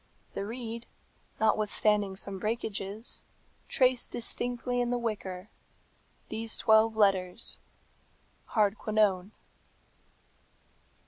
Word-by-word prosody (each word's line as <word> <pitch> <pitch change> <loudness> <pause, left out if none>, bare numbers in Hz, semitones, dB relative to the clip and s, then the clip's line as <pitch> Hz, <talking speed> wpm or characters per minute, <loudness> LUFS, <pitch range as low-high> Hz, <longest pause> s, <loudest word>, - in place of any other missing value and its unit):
The 200 - -3
reed, 230 0 -5 0.5
notwithstanding 210 -2 +2
some 195 0 -4
breakages, 215 0 -3 0.4
traced 255 -1 +3
distinctly 245 +1 -1
in 240 - 0
the 245 - +1
wicker 215 -6 -3
work 185 - -15 0.8
these 225 0 -2
twelve 220 0 +5
letters 195 -1 +2 1.0
Hardquanonne. 210 -2 +2
215 Hz, 80 wpm, -30 LUFS, 200-230 Hz, 1.0 s, twelve